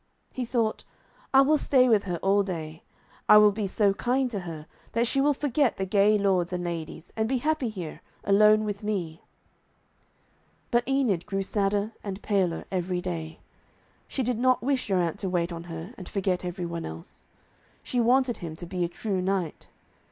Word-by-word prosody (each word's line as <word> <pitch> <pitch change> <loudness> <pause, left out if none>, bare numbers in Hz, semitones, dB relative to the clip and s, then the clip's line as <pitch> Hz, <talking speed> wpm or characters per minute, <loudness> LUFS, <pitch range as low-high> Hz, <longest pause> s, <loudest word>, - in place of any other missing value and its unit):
He 255 - -3
thought, 230 -2 -1 0.5
'I 270 - +7
will 300 +2 +3
stay 255 -3 +4
with 215 -4 +3
her 175 -3 -2
all 195 +1 +4
day. 165 -4 -5 0.5
I 210 - +10
will 210 0 +7
be 205 0 -2
so 200 +1 +2
kind 250 +4 0
to 205 - -2
her 165 -4 -7 0.3
that 230 +1 +2
she 270 +3 +1
will 290 +1 +3
forget 280 -2 +1
the 190 - -1
gay 205 +2 +4
lords 190 -4 +1
and 180 -1 -2
ladies, 170 -1 -6
and 220 0 0
be 265 - +1
happy 300 -1 0
here, 180 -7 -7 0.2
alone 215 +2 +5
with 205 -1 -4
me.' 185 -7 -3 1.5
But 240 0 +2
Enid 250 -11 +1
grew 195 -1 -1
sadder 205 +1 0
and 195 -1 -5
paler 190 -5 0
every 180 -1 -1
day. 165 -3 -5 0.7
She 265 - -2
did 240 -1 -1
not 255 0 +3
wish 270 0 0
Geraint 185 -1 0
to 190 - -2
wait 175 -1 -1
on 170 0 -7
her 165 +5 -7
and 185 - -8
forget 185 -2 -1
every 180 0 -4
one 170 0 -4
else. 80 +1 -9 0.6
She 250 - -2
wanted 245 0 +3
him 165 -2 -6
to 175 - -7
be 180 0 -2
a - - +1
true 190 +1 -2
knight. 185 -4 -2
200 Hz, 185 wpm, -27 LUFS, 175-235 Hz, 1.5 s, I